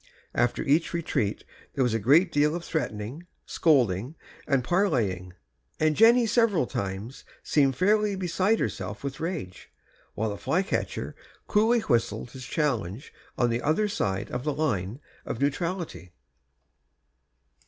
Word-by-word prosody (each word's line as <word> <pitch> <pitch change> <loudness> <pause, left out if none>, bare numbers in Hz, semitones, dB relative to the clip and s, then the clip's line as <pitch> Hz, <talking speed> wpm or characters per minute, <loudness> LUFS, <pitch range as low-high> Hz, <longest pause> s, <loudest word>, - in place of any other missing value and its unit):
After 120 - +1
each 155 +5 +2
retreat 135 -11 -1 0.3
there 135 - +2
was 125 -3 +1
a 115 - +1
great 155 - +4
deal 150 +2 +2
of 170 0 -5
threatening, 135 +1 -4 0.2
scolding, 125 - +2 0.3
and 140 -3 +2
parleying, 115 - 0 0.5
and 155 -1 +2
Jenny 235 +4 +6
several 225 - +3
times 100 +4 -5 0.2
seemed 135 -3 +2
fairly 210 - +2
beside 190 +4 +1
herself - - -4
with 140 -1 -5
rage, 160 - -5 0.5
while 110 0 -1
the 100 - -5
flycatcher 185 +4 -1 0.3
coolly 225 +3 +3
whistled 120 - 0
his 130 -1 -9
challenge 120 - -2 0.2
on 120 -1 +2
the 120 +1 -1
other 160 +8 +1
side 100 - -2
of 125 0 -3
the 150 -1 -1
line 120 -7 -1 0.2
of 115 - -5
neutrality. 145 - -2
140 Hz, 130 wpm, -27 LUFS, 115-175 Hz, 0.5 s, Jenny